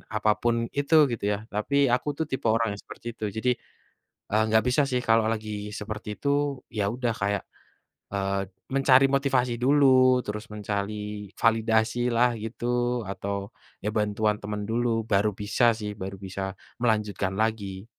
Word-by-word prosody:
apa 105 0 +3
pun 120 0 +2 0.2
itu 145 +3 +2 0.2
gitu 115 - -3
ya - - -1 0.2
tapi 105 +7 -1 0.2
aku 125 +3 0
tuh 160 - 0
tipe 130 -3 -1
orang 115 0 +2
yang 100 - -9
seperti - - -11
itu 110 - -4
jadi, 125 +3 +1 0.8
eee, 110 +1 +4
gak 110 - +5
bisa 125 +4 +3
sih 125 -1 +1
kalau 110 0 +5
lagi 110 -1 -4 0.3
seperti 105 0 -6
itu 140 - -2 0.5
ya 105 - +2
udah 120 -2 0
kayak, 100 0 0 0.7
eee, 100 0 0 0.3
mencari 135 -1 +6
motivasi 130 -3 +1
dulu 130 -2 +5
terus 105 +1 -5
mencari 105 0 -3 0.5
validasilah 115 +2 +3
gitu 115 +1 -6 0.4
atau 100 +1 -4 0.3
ya 105 - 0
bantuan 105 0 +1
teman 105 0 -4
dulu 120 +2 +1 0.2
baru 100 +1 +4
bisa 105 +4 +2
sih 105 -1 -4
baru 95 +1 -5
bisa 95 0 -6 0.4
melanjutkan 105 -4 0
lagi. 105 -3 -2
110 Hz, 150 wpm, -26 LUFS, 105-125 Hz, 0.8 s, mencari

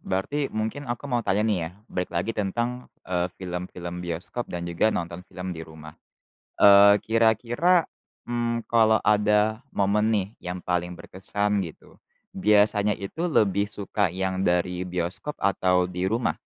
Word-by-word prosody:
berarti 135 +10 -2
mungkin 110 +6 -4
aku 120 +3 -4
mau 125 -4 0
tanya 105 -2 +1
nih 105 -4 +1
ya - - -14 0.2
balik 90 0 -2
lagi 90 +7 -1
tentang, 120 +5 -2 0.2
eee, 90 -1 -1
film-film 90 -1 -6
bioskop 90 +7 -5
dan 85 0 -4
juga 85 +5 +1
nonton 85 -4 -3
film 90 0 -6
di 80 - -7
rumah. 80 -1 -11 0.7
Eee, 100 0 +8
kira-kira, 120 - +3 0.4
mmm, 120 -1 -2
kalau 110 -1 +4
ada 105 +1 +3
momen 105 +2 +1
nih 105 -4 +1 0.2
yang 90 +1 -4
paling 90 0 -2
berkesan 100 +2 -2
gitu 80 -3 -11 0.4
biasanya 105 +1 +3
itu 155 - -3
lebih 100 -5 +2
suka 100 0 -1
yang 95 0 -1
dari 90 +1 +1
bioskop 90 +11 -4
atau 90 -2 +2
di 90 +1 -3
rumah? 115 +3 0
100 Hz, 145 wpm, -25 LUFS, 90-110 Hz, 0.7 s, Eee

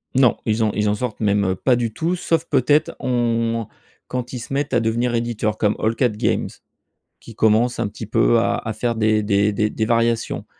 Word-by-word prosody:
Non. 130 -2 +4
Ils 110 0 +1
en 110 - +1
ils 105 0 0
en 105 - +1
sortent 110 0 -4
même 100 -3 +1
pas 125 +6 +2
du 120 -2 -2
tout, 165 +9 -1
sauf 165 -2 -1
peut-être, 145 +2 +2
on 115 -2 0 0.4
quand 125 -1 -4
ils 125 - -4
se 120 - -7
mettent 140 0 -1
à 120 - +4
devenir 115 +2 0
éditeur 115 -2 -1
comme 105 -1 +1
All 110 +1 0
Cat 125 +1 +2
Games 105 0 -1 0.7
qui 115 - -13
commence 110 +3 +2
un 115 -3 -1
petit 110 +2 -8
peu 115 +2 +3
à 120 +1 +1
à 110 - -4
faire 115 +2 -2
des 110 -1 +2
des 100 0 +2
des 105 +2 -1
variations. 115 0 0
115 Hz, 205 wpm, -21 LUFS, 110-120 Hz, 0.7 s, Non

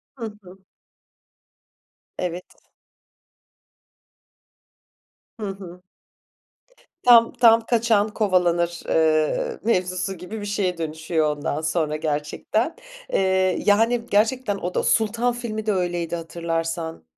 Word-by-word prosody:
Hı 240 -4 -6 0.2
hı. 185 +1 -14 1.6
Evet. 180 0 -4 2.9
Hı 210 - -3
hı. 180 -2 -9 1.2
Tam, 235 -2 +6
tam 230 -1 +5
kaçan 225 -3 +2
kovalanır, 175 -4 +1
eee, 155 -1 +1
mevzusu 185 -3 0
gibi 180 +5 -7
bir - - -5
şeye 195 -3 -1
dönüşüyor 160 -1 -1
ondan 145 +1 -3
sonra 160 -1 -1
gerçekten. 155 - -2 0.4
Eee, 190 -1 +1
yani, 230 +3 +3
gerçekten 220 0 +1
o 180 -1 -4
da - - 0
Sultan 230 +2 +1
filmi 220 -3 -5
de 215 - +2
öyleydi 175 -2 -2
hatırlarsan. 165 - -4
185 Hz, 100 wpm, -23 LUFS, 165-220 Hz, 2.9 s, Tam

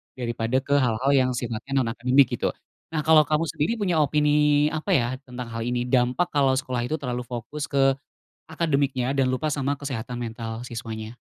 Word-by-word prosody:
daripada 120 0 -1
ke 140 +1 0
hal-hal 130 0 +1
yang 130 -1 +3
sifatnya 120 +2 -5
non 115 - -1
akademik 125 +2 +3
gitu. - - -1 0.4
Nah 155 - 0
kalau 155 0 +5
kamu 155 +2 +1
sendiri 160 +11 0
punya 180 -5 +1
opini 150 0 +3
apa 155 +5 -3
ya 120 -6 +3 0.2
tentang 125 -1 -7
hal 115 0 -5
ini? 120 0 -1
Dampak 125 +7 +2
kalau 135 -2 +2
sekolah 130 -2 -1
itu 155 +6 -1
terlalu 125 -3 -3
fokus 125 +5 -5
ke 135 -1 +2 0.5
akademiknya 140 -5 0
dan 135 -2 +2
lupa 130 +4 -1
sama 140 0 -1
kesehatan 125 -4 -5
mental 115 0 -5
siswanya. 110 -2 -6
130 Hz, 175 wpm, -25 LUFS, 120-145 Hz, 0.5 s, kalau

